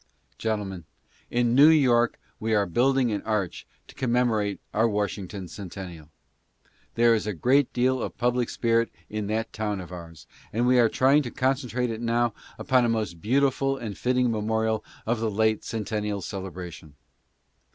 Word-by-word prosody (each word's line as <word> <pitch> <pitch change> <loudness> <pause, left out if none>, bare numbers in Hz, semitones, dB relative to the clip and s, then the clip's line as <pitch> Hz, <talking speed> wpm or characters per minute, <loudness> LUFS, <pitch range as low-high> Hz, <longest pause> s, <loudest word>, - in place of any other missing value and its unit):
Gentlemen, 100 -6 -3 0.4
in 120 -1 +1
New 145 +5 +8
York 125 -7 +4 0.2
we 110 0 0
are 100 -1 +3
building 125 +6 +2
an 105 - -1
arch 105 -5 -2 0.2
to - - -14
commemo 120 -2 +1
rate 100 -1 -2
our 115 +2 +3
Washington 100 -2 -3
Centennial. 90 -4 -9 0.9
There 115 0 +5
is 110 -2 0
a 105 - -1
great 130 - +3
deal 130 +1 +1
of - - -5
public 125 0 +1
spirit 115 -1 +1 0.2
in 105 -1 -3
that 110 +2 -2
town 105 -2 -2
of 90 -1 -9
ours, 85 -3 -10 0.3
and 120 +3 0
we 125 0 +5
are 115 -2 +5
trying 135 +5 +4
to 125 - -5
concentrate 125 -2 -1
it 110 0 -5
now 120 -1 +1 0.2
upon 130 -3 +2
a 120 - +2
most 105 -8 -2
beautiful 135 +3 +1
and 110 -6 -5
fitting 125 -1 +1
memorial 110 0 0 0.2
of 115 0 0
the 115 0 0
late 110 +1 +1
Centen 110 -1 -3
nial 105 -1 -2
celebration. 90 -5 -7
110 Hz, 165 wpm, -26 LUFS, 105-125 Hz, 0.9 s, New